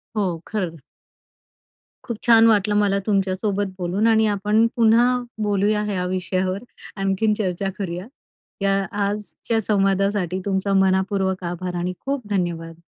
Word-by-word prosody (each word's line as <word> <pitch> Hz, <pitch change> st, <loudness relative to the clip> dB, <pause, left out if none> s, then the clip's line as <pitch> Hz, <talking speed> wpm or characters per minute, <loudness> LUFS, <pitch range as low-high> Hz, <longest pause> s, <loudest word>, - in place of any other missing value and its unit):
हो, 185 Hz, -6 st, -1 dB
खरं. 185 Hz, -7 st, -3 dB, 1.3 s
खूप 235 Hz, -3 st, -4 dB
छान 230 Hz, -1 st, +7 dB
वाटलं 210 Hz, -1 st, +3 dB
मला 200 Hz, -1 st, +2 dB
तुमच्या 195 Hz, -3 st, +1 dB
सोबत 205 Hz, 0 st, -1 dB
बोलून 185 Hz, +4 st, 0 dB
आणि 220 Hz, -1 st, +4 dB
आपण 210 Hz, +2 st, +2 dB
पुन्हा 230 Hz, +1 st, +5 dB, 0.4 s
बोलूया 210 Hz, +1 st, +1 dB
या 180 Hz, -1 st, -1 dB
विषयावर, 185 Hz, +1 st, -1 dB, 0.4 s
आणखीन 195 Hz, +2 st, +1 dB
चर्चा 195 Hz, -1 st, -1 dB
करूया. 180 Hz, 0 st, -4 dB, 0.5 s
या 195 Hz, 0 st, +2 dB, 0.2 s
आजच्या 210 Hz, +2 st, -2 dB
संवादासाठी 195 Hz, -2 st, +1 dB
तुमचा 195 Hz, 0 st, 0 dB
मन:पूर्वक 190 Hz, 0 st, +1 dB
आभार 175 Hz, +1 st, -4 dB
आणि 175 Hz, +1 st, -2 dB
खूप 275 Hz, -5 st, -2 dB
धन्यवाद. 170 Hz, -4 st, -2 dB
195 Hz, 125 wpm, -22 LUFS, 185-210 Hz, 1.3 s, छान